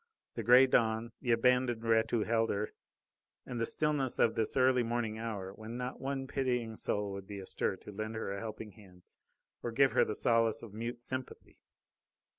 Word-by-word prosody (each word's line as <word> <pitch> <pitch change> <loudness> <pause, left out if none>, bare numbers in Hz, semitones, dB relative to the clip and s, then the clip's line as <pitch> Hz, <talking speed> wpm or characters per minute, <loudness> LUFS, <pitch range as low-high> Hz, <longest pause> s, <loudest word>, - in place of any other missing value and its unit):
The 115 - -4
grey 125 +4 +7
dawn, 115 -2 +1
the 125 - -4
abandoned 120 0 +2
wretch 110 -1 +3
who 115 -3 +1
held 115 0 +1
her, 105 +1 -2 0.7
and 120 -2 -4
the 115 - +1
stillness 150 -4 +1
of 115 - +3
this 110 +4 0
early 130 -1 +4
morning 115 -2 -2
hour, 100 -4 -4
when 110 +3 -8
not 125 +1 -5
one 135 0 -2
pitying 125 -4 -1
soul 105 -1 -1
would 100 0 -7
be 100 - -7
astir 95 0 -2
to 105 - -11
lend 110 +2 -5
her 110 -3 -3
a 100 - -4
helping 110 -1 -7
hand 90 -3 -17 0.6
or 120 - -3
give 135 +3 +4
her - - +4
the 105 - -3
solace 115 -2 +2
of 110 -4 -10
mute 120 +2 -5
sympathy. 130 +1 -6
115 Hz, 190 wpm, -32 LUFS, 110-125 Hz, 0.7 s, grey